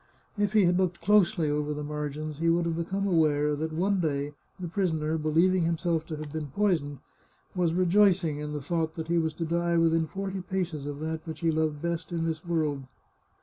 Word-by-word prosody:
If 205 -1 0
he 210 -3 +5
had 180 +1 +3
looked 180 -2 0
closely 200 -5 +3
over 150 0 -1
the 150 - -4
margins 150 0 -4
he 165 +1 +2
would 170 +1 +2
have 165 -1 -1
become 190 +4 -2
aware 150 -5 +2
that 160 +2 -3
one 190 +5 +1
day 145 -3 -1 0.3
the 180 - -4
pris 185 +2 0
oner, 155 0 -1
believing 165 +4 +3
himself 165 -1 0
to 160 - -4
have 150 -1 -7
been 155 -2 -3
poisoned, 155 -4 0 0.6
was 170 -2 +1
rejoicing 180 -4 +3
in 150 0 -4
the 150 -2 -4
thought 160 +1 -1
that 160 0 -5
he 170 0 +3
was 160 -1 -1
to 165 - -3
die 170 +1 +1
within 165 -1 +3
forty 195 +1 -4
paces 175 -6 -3
of 145 0 -5
that 160 +1 -4
which 160 - -6
he 165 - +2
had 160 - 0
loved 155 -1 -1
best 170 -1 -3
in 165 -1 -1
this 160 -1 -3
world. 155 -6 -1
165 Hz, 215 wpm, -28 LUFS, 155-175 Hz, 0.6 s, he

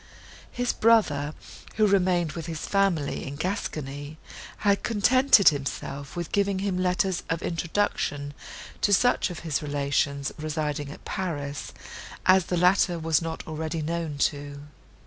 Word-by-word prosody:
His 245 0 -1
brother, 155 -11 +3 0.4
who 215 - +4
remained 180 -5 +2
with 165 0 -6
his 160 -2 -4
family 195 -8 +1
in 140 - -5
Gascony, 150 -4 -4 0.5
had 200 -1 +3
contented 235 0 +5
himself 140 0 -5
with 175 -2 -4
giving 200 -1 +1
him 195 -1 -1
letters 180 0 +1
of 165 0 -1
introduction 165 -5 -1 0.5
to 205 - +5
such 245 +1 +2
of 175 - -7
his 155 -4 -2
relations, 140 -1 -1
residing 150 -2 -2
at 145 - -11
Paris, 145 -7 -4 0.5
as 185 -1 +5
the 180 - 0
latter 180 0 +3
was 160 -1 +1
not 165 -1 -5
already 160 0 -3
known 165 -2 -3
to. 145 -1 -9
165 Hz, 135 wpm, -26 LUFS, 145-190 Hz, 0.5 s, contented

